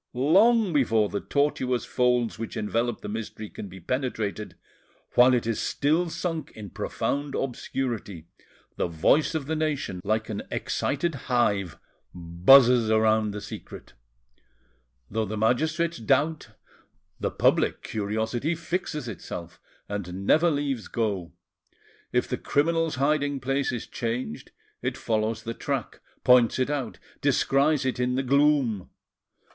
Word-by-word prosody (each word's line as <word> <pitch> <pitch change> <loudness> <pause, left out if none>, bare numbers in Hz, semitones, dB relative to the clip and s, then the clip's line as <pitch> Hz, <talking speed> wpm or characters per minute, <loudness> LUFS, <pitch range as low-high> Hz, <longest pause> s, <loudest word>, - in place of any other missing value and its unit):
Long 195 - +4
before 115 -7 +2
the 100 - -2
tortuous 130 -4 0
folds 125 -3 +1
which 115 - -5
envelop 115 +2 -1
the - - -6
mystery 110 0 -6
can 100 - -7
be 95 0 -11
penetrated, 110 -2 -3 0.6
while 125 +1 +6
it 120 - -1
is 115 -1 -1
still 160 +5 +1
sunk 165 -1 -3
in 105 -4 -9
profound 140 0 -2
obscurity, 120 -9 -3 0.5
the - - 0
voice 85 - +2
of 155 -3 -2
the 160 +3 -2
nation, 145 - -2
like 110 +2 0
an 105 -2 -4
excited 160 +4 -1 0.2
hive, 100 -8 +1 0.4
buzzes 110 +8 +5
around 110 0 +3
the 105 0 -5
secret; - - -10 1.1
though 110 +1 -1
the 110 +1 -4
magistrates 155 +9 +1
doubt, 140 +4 +1 0.7
the - - -1
public - - +1
curiosity 110 +8 -2
fixes 165 -4 -3
itself, 85 -5 -7 0.3
and 100 -2 -5
never 165 +10 +4
leaves 140 -6 -2
go; 100 -7 -2 0.8
if - - +1
the - - -3
criminal's 165 +2 +1
hiding 145 +1 +1
place 135 +2 0
is 120 -2 -4
changed, 115 -6 -4 0.3
it - - -2
follows 110 0 -1
the 115 - -4
track, - - -4 0.2
points 125 -2 +5
it 130 +2 0
out, 145 -3 -3 0.2
descries 140 +1 +2
it 130 -1 -1
in 125 0 +1
the 135 - 0
gloom. 135 -7 +2
125 Hz, 130 wpm, -26 LUFS, 110-145 Hz, 1.1 s, while